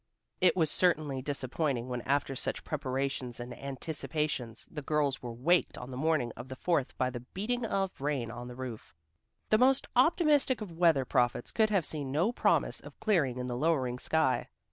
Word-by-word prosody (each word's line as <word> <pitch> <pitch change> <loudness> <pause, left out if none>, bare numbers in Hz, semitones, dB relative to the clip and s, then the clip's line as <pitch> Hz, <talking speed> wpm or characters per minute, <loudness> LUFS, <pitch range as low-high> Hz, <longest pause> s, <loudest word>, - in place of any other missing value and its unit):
It 185 0 +4
was 160 -3 +3
certainly 155 -7 +1
disappointing 135 -1 -2
when 125 -1 -3
after 140 0 +1
such - - -3
preparations 135 -3 -2
and 120 0 -6
anticipations, 140 -3 -3
the 150 - -5
girls 145 -2 0
were 120 - -5
waked 155 +10 +2
on 125 +1 -7
the - - -6
morning 140 -3 +1
of - - -8
the 130 - -5
Fourth 150 -2 0
by 130 0 +1
the 120 - -5
beating 210 - -3
of 195 -6 -2
rain 135 -5 -1
on 120 +1 -7
the 125 - -8
roof. 125 -9 -7 0.6
The 215 - +5
most 260 +2 +4
optimistic 295 -2 +4
of 210 -5 -6
weather 160 -7 +4
prophets 120 -1 +1
could 220 -1 +3
have 195 -6 +2
seen 145 -4 -3
no 170 - +2
promise - - +2
of - - -13
clearing 155 - +2
in 125 - -3
the 125 -1 -3
lowering 130 -4 +1
sky. 160 -3 +1
140 Hz, 185 wpm, -31 LUFS, 125-170 Hz, 0.6 s, The